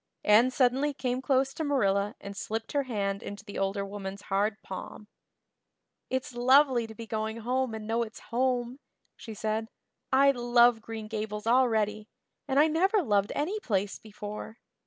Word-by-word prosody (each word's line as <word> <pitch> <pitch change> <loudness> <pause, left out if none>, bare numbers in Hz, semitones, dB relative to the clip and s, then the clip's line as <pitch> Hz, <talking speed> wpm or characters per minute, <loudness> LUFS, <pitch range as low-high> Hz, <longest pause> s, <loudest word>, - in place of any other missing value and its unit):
Anne 220 +4 +6
suddenly 265 +3 +2
came 255 0 -2
close 270 0 +1
to 320 - -4
Marilla 205 -8 +1
and 200 0 -8
slipped 225 +3 -4
her 285 - +1
hand 200 -6 -2
into 205 +1 -8
the 205 - -6
older 195 +1 -1
woman's 195 0 -7
hard 210 +2 +1
palm. 195 +2 -8 1.0
"It's 260 -1 -2
lovely 255 0 +4
to 220 - -11
be 230 - -8
going 220 0 -3
home 250 0 -1
and 220 -1 -7
know 225 +2 0
it's 225 -1 -5
home," 250 +1 0 0.4
she 225 -2 -9
said. 220 +1 -2 0.4
"I 275 +1 +6
love 240 -2 +4
Green 220 -1 -7
Gables 215 -1 -4
already, 220 -3 +2 0.4
and 270 0 +2
I 300 - +7
never 375 +6 +2
loved 205 -5 +1
any 365 +9 -1
place 205 - -1
before. 210 +1 -8
225 Hz, 160 wpm, -29 LUFS, 210-260 Hz, 1.0 s, I